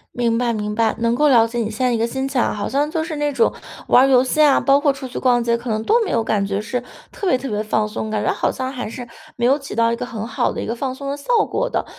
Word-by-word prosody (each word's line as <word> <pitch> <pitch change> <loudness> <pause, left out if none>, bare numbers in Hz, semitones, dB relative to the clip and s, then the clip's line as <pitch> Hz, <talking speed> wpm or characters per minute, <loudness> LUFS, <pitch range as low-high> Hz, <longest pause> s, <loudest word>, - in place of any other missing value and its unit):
明 235 -1 +1
白 240 -1 0
明 210 0 -3
白， 225 -1 +1
能 230 +1 +1
够 300 +3 +3
了 230 -4 +5
解 240 +1 -6
你 220 -2 -1
现 235 +4 -3
在 - - +1
一 235 - +1
个 230 - +1
心 265 +3 -3
情 270 -2 -1
哈， - - +1
好 205 -1 -3
像 290 +2 0
就 320 -1 -1
是 320 -2 -5
那 295 -1 -1
种 235 - +2 0.4
玩 255 - +6
儿 - - +2
游 255 0 +5
戏 265 +4 -2
啊， 285 -2 +5
包 275 0 +3
括 285 -2 +2
出 265 -1 -7
去 250 - -8
逛 245 -2 +2
街， 235 0 +1
可 235 -1 -5
能 215 0 -1
都 450 - +3
没 - - -3
有 225 - +1
感 205 -3 0
觉 200 +1 -2
是 235 +3 -3 0.3
特 395 - -4
别 305 - +4
特 260 +1 -4
别 210 0 -2
放 215 0 0
松， 215 +1 -5
感 215 -1 -1
觉 - - +1
好 - - 0
像 260 0 -4
还 250 -4 -5
是 240 +2 -8 0.3
没 235 - 0
有 275 +3 +4
起 275 -1 -9
到 230 +1 +2
一 - - 0
个 250 +1 -5
很 225 -2 -6
好 225 - 0
的 - - -4
一 - - -5
个 230 - -2
放 260 +1 -3
松 275 +1 -6
的 285 - -3
效 280 - -13 0.2
果 - - -1
的。 - - -1
245 Hz, 350 characters per minute, -20 LUFS, 225-275 Hz, 0.4 s, 玩